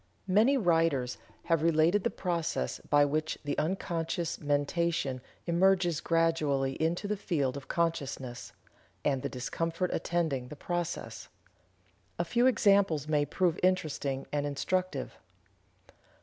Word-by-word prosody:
Many 215 +9 +4
writers 165 - +1 0.2
have 165 -2 +1
related 165 +4 +3
the - - +2
process 170 - -2
by 145 0 +5
which 155 +2 -1
the 145 - -2
unconscious 165 0 -2
mentation 145 -2 0 0.2
emerges 175 -1 +3
gradually 155 -5 +1
into 170 +5 0
the 210 - 0
field 145 -9 -1
of 140 -1 -8
consciousness, 140 -7 -2 0.5
and 135 -3 +1
the - - -3
discomfort 165 +7 -2
attending 160 -7 -1
the 150 - -9
process. 175 +2 -4 0.9
A - - 0
few 245 +1 +3
examples 200 - +3
may 150 -1 +2
prove 175 +3 0
interesting 150 -7 0
and 145 0 0
instructive. 185 +6 -2
165 Hz, 120 wpm, -30 LUFS, 145-175 Hz, 0.9 s, by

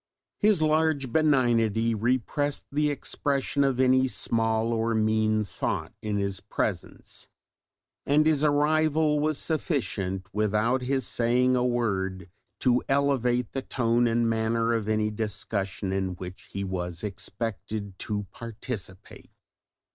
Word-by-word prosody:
His 205 -6 +3
large 155 -4 +1
benignity 115 -7 +3
repressed 130 +6 -1
the 150 +1 +1
expression 140 0 0
of 135 -2 +1
any 130 0 +4
small 115 -2 +1
or 115 0 0
mean 110 0 +2
thought - - -3
in 105 -1 -2
his 100 -1 -1
presence; - - -4 0.8
and 150 +2 +3
his 155 -2 +2
arrival 150 +1 +3
was 155 0 0
sufficient 110 - -2
without 110 +4 +1
his 130 +1 0
saying 125 +2 +2
a 125 - +2
word 95 -7 -1 0.3
to 125 -1 +3
elevate 125 -4 +1
the 135 - -3
tone 120 -2 +1
and 115 0 +2
manner 115 +1 +1
of 110 -2 -1
any 110 0 +1
discussion 105 -2 -3
in 95 -1 -1
which 90 +1 -9
he 100 - -3
was 90 -2 -4
expected 100 0 -5
to 105 -1 -3
participate. 115 -5 -8
115 Hz, 125 wpm, -27 LUFS, 105-135 Hz, 0.8 s, any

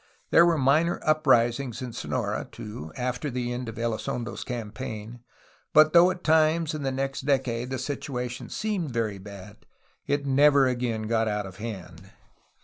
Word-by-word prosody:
There 170 - +7
were 170 -2 +3
minor 150 +5 +2
uprisings 130 -5 +2
in 125 -2 -6
Sonora, - - -3
too, 80 -8 -8
after 125 +4 -2
the 120 -1 -3
end 120 -1 -4
of 110 - -9
Elizondo's 115 +1 -3
campaign, 115 -1 -6 0.6
but 155 0 +7
though 175 +1 +7
at 180 -1 -5
times 160 0 +3
in 155 - -4
the 135 -1 -1
next 135 +1 -2
decade 130 -3 0
the 130 - -2
situation 130 -2 -4
seemed 205 -7 -2
very 110 -5 -2
bad, 100 +1 -11 0.5
it 145 0 0
never 140 0 +5
again 120 -3 -1
got 110 0 +1
out 105 -1 -1
of 95 0 -10
hand. 95 -5 -8
125 Hz, 155 wpm, -26 LUFS, 115-145 Hz, 0.6 s, There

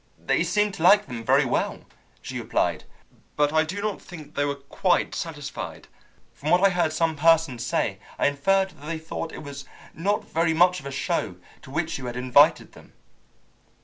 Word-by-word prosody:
"They - - 0
seemed 210 -1 +1
to - - -8
like 205 +4 +6
them 120 -3 -7
very - - +4
well," - - -1 0.4
she - - -5
replied, - - -1 0.5
"but 145 0 +2
I 155 0 +4
do 190 +6 -5
not 215 -2 -2
think 160 -5 -11
they 145 - 0
were 140 0 -1
quite 140 +6 0
satisfied. 150 -4 -6 0.5
From 150 - -5
what 180 +3 +5
I 195 - +5
heard 175 -3 +1
some 160 0 0
persons 155 -5 +3
say, 120 - -1 0.2
I - - +1
inferred 190 +7 +2
that 150 -3 -13
they 165 0 -2
thought 160 +1 -6
it - - -9
was 140 -1 -8 0.3
not 200 +6 -1
very 165 0 +1
much 180 +2 +4
of 135 - -9
a - - -5
show 135 - -2 0.3
to - - -14
which 160 +2 -2
you 130 - -6
had 120 0 -5
invited 140 +5 +4
them." - - -17
160 Hz, 190 wpm, -25 LUFS, 140-180 Hz, 0.5 s, like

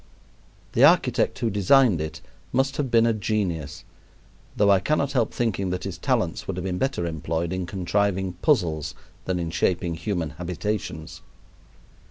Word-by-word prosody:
The - - +3
architect - - +4
who 115 -3 -1
designed 105 - +4
it 80 -1 -5 0.3
must 135 +2 +1
have 140 -3 -1
been 115 -1 +4
a 115 - +3
genius, 90 -9 -2 0.7
though 100 -1 +5
I 95 - +5
cannot 140 +6 0
help 120 -4 +1
thinking 100 -5 -1
that 90 0 -3
his - - -5
talents - - -1
would 95 - -3
have 90 - -3
been 90 -1 -2
better 135 -10 -1
employed 80 +1 -2
in 95 -1 -3
contriving 95 0 0
puzzles 80 - +1 0.3
than 95 -1 -1
in 85 -2 -3
shaping 90 0 0
human 85 -2 -3
habitations. 85 -2 -4
95 Hz, 155 wpm, -25 LUFS, 85-110 Hz, 0.7 s, though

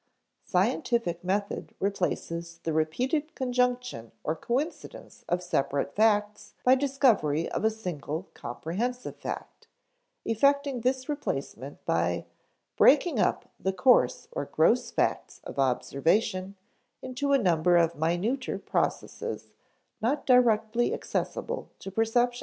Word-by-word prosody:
Scientific 210 - 0
method 200 +2 -2
replaces 170 -3 -2
the 165 - -1
repeated 255 - 0
conjunction 250 - -1
or 155 - -1
coincidence 265 - -4
of 180 +1 0
separate 140 -4 -1
facts 210 -1 +1
by 255 - +6
discovery 255 - +2
of - - -2
a 220 - +5
single 180 -5 -5
comprehensive 215 - -4
fact, - - -7 0.6
effecting 280 +2 +2
this 260 +2 0
replacement 290 -1 -4
by - - 0 0.5
_breaking 290 -2 +5
up - - 0
the 190 - -1
coarse 250 - +3
or - - -3
gross - - +2
facts - - -1
of - - -7
observation 185 - +1 0.5
into 260 +2 -2
a 280 - +6
number 175 -5 +3
of 170 -1 +3
minuter 175 - -1
processes 470 0 -3 0.5
not 270 +6 0
directly 240 -2 +3
accessible - - -3
to 195 - -8
perception_. 240 +4 +1
220 Hz, 110 wpm, -28 LUFS, 175-255 Hz, 0.6 s, by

